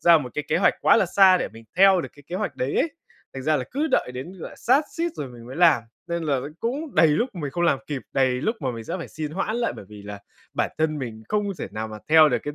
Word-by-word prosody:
ra 170 -1 +7
một 130 -5 -6
cái 150 - -2
kế - - +2
hoạch - - +4
quá - - +5
là - - +3
xa 190 -2 +6
để - - -2
mình 115 +1 -14
theo 190 0 +6
được - - -6
cái 145 - -15
kế 180 - -4
hoạch 205 +1 -3
đấy 130 +2 -2
ấy. 330 - +2 0.4
Thành 135 - -5
ra 155 +2 +2
là 130 - -2
cứ 290 +4 0
đợi - - +2
đến, 130 +8 -6
gọi - - -6
là, - - -14
sát 275 +5 +3
suýt 335 +1 0
rồi 140 - -4
mình 120 -1 -12
mới 130 +4 -8
làm, 165 -8 +5 0.3
nên 170 0 -2
là 150 -3 +1
ấy, 135 +3 -5
cũng 275 +5 -3
đầy 165 - +6
lúc 155 - +1
mình 150 -5 -4
không 175 +6 -2
làm 140 -5 +3
kịp, 140 -3 -4
đầy 135 -1 +3
lúc 225 - 0
mà 130 - -1
mình 115 -2 -7
sẽ 170 - -4
phải 165 - -7
xin 155 -1 -5
hoãn 195 +7 -2
lại, 240 -1 0
bởi - - -9
vì 105 -1 -11
là 100 0 -8 0.3
bản - - 0
thân 155 -1 +1
mình 115 -5 -6
không 210 -1 +1
thể - - -4
nào 110 +1 -4
mà 110 - -7
theo 155 0 +7
được 125 - +1
cái 145 - -5
155 Hz, 300 wpm, -24 LUFS, 130-185 Hz, 0.4 s, ra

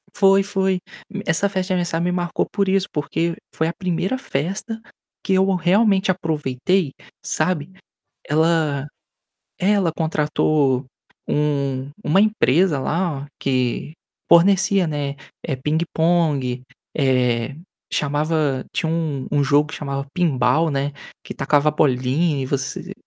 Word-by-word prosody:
Foi, 195 0 +5
foi. 190 -1 0 0.5
Essa 165 +5 +2
festa 190 -2 -2
de 190 - 0
aniversário 170 -2 0
me 180 - +1
marcou 175 -1 -1
por 200 -2 0
isso, 195 0 +2
porque 165 +3 -1 0.2
foi 160 - 0
a 165 - -2
1ª 185 +7 -1
festa 210 - -3 0.4
que 195 - 0
eu 190 +1 +3
realmente 190 +3 +3
aproveitei, 160 -1 -1 0.3
sabe. 160 0 -1 0.6
Ela 155 -2 +1 0.7
é, 195 +3 +2
ela 195 -5 +2
contratou 150 -4 +1 0.4
um 140 -2 0
uma 165 +6 +4
empresa 185 -6 +3
lá, 150 -1 -1
que 130 +1 -1 0.4
fornecia, 190 +2 +5
né, 145 -2 -3 0.3
eh, 140 - -2
pingue-pongue, 155 -3 0 0.3
eh, 125 -2 +1 0.4
chamava 150 -1 0
tinha 170 -6 -1
um 155 -5 -2
um 145 -1 +3
jogo 145 +2 +3
que - - -7
chamava 140 -1 -4
Pinball, 155 -2 +2
né, 140 0 -1 0.3
que - - -7
tacava 145 +1 +2
bolinha 140 +1 +1
e - - -3
você 130 0 -3
160 Hz, 125 wpm, -21 LUFS, 140-185 Hz, 0.7 s, Foi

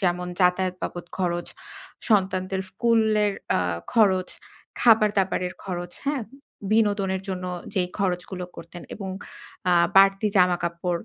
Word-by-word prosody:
যেমন 180 -2 0
যাতায়াত 180 0 +2
বাবদ 175 0 -5
খরচ, 175 -1 -1 0.6
সন্তানদের 190 -2 +1
স্কুলের 215 0 +2 0.2
অ্যা - - +3 0.3
খরচ, 190 -5 +3 0.5
খাবার-দাবারের 200 -5 +3
খরচ, 175 -2 -5
হ্যাঁ? 280 -3 -1 0.5
বিনোদনের 205 -3 +1
জন্য 185 -1 -4 0.3
যেই 180 -2 +1
খরচগুলো 180 -1 -2
করতেন 175 - -10
এবং 195 -2 -6 0.6
অ্যা 180 - +4 0.2
বাড়তি 195 +2 +6
জামা-কাপড়, 175 -1 +1
190 Hz, 110 wpm, -24 LUFS, 180-205 Hz, 0.6 s, বাড়তি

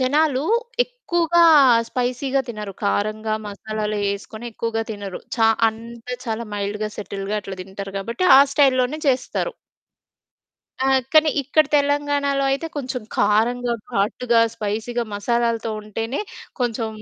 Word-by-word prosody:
జనాలు 280 +1 +2 0.4
ఎక్కువగా 345 -9 +1 0.5
స్పైసీగా 255 +2 -1
తినరు. 210 -3 -6
కారంగా 215 +2 0
మసాలాలు 215 +1 -4 0.2
ఏసుకొని 220 +3 -8
ఎక్కువగా 225 0 -2
తినరు. 205 -3 -6 0.2
చా 225 -1 +4 0.2
అంత 230 +2 -10 0.2
చాలా 225 0 -3
మైల్డ్‌గా, 205 +1 -2
సెటిల్డ్‌గా 200 0 -4
అట్లా 195 -1 -7
తింటారు 195 +1 -8
కాబట్టి, 230 - -3
ఆ - - +9
స్టైల్‌లోనే 270 +1 +2
చేస్తారు. 255 -1 -1 1.3
ఆహ్, 265 0 +4
కానీ 310 0 +6
ఇక్కడ 285 +3 +3
తెలంగాణలో 285 -1 +1
అయితే 275 +4 -2
కొంచెం 255 -3 -3
కారంగా, 235 +4 +2 0.2
ఘాటుగా, 230 +3 +2
స్పైసీగా, 220 +3 -2
మసాలాలతో 230 +2 0
ఉంటేనే, 225 +5 -4 0.4
కొంచెం 230 -2 -1
235 Hz, 115 wpm, -22 LUFS, 215-270 Hz, 1.3 s, ఆ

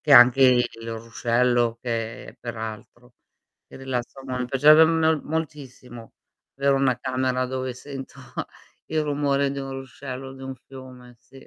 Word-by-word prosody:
che 150 - +1
anche 125 +2 +8
il 120 -3 +3
ruscello, 115 +1 +1
che 115 -2 -4
peraltro. 120 +1 -8 0.5
E - - -12
rilassa 130 0 -4
mon 130 -1 -3
mi 125 - -1
piacerebbe 150 +5 +7
mel 160 -1 +2
moltissimo, 135 -7 -6 0.4
avere 140 0 +3
1 135 -2 +2
camera 130 0 -1
dove 130 0 -3
sento 135 0 -9 0.7
il 155 -1 0
rumore 140 -1 +1
di 140 - -4
un 135 - -6
ruscello 135 0 -7
o - - -9
di 135 - -12
un 135 0 -5
fiume, 130 -2 -12
sì. 125 +3 -17
130 Hz, 145 wpm, -24 LUFS, 120-140 Hz, 0.7 s, anche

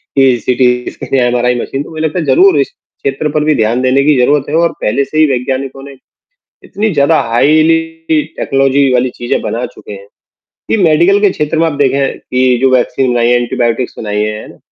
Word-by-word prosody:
कि 135 -3 +3
सिटीज़ 125 -1 0
के - - -2
लिए 135 - +2
एमआरआई 125 0 0
मशीन, 135 +1 -4
तो - - -13
मुझे 155 -1 -6
लगता 160 +3 -2
है 165 - -3
ज़रूर 375 - +4
इस - - 0
क्षेत्र 150 - -5
पर 150 0 0
भी 155 0 +2
ध्यान 115 +3 0
देने 130 +2 +2
की 150 0 +3
ज़रूरत 145 +2 +2
है 150 - -2
और 170 0 +2
पहले 125 +6 0
से 155 - -6
ही 155 - +5
वैज्ञानिकों 135 +1 -3
ने, 140 0 -11 0.7
इतनी 215 +2 -2
ज़्यादा 145 +2 +3
हाइली 155 +7 +3 0.6
टेक्नोलॉजी 135 0 +1
वाली 125 0 +1
चीज़ें 120 - -2
बना - - -3
चुके - - -13
हैं, 100 0 -10 0.6
कि - - +1
मेडिकल 170 +5 +3
के 205 - +4
क्षेत्र 150 -1 -2
में 165 - +3
आप 160 - -2
देखें 135 0 0
कि 125 -1 0
जो 135 - +3
वैक्सीन 125 +1 0
बनाई 120 -1 +1
हैं, 120 - +4
एंटीबायोटिक्स 120 0 -2
बनाई 105 -1 -2
हैं। 105 0 -6
135 Hz, 205 wpm, -12 LUFS, 125-155 Hz, 0.7 s, ही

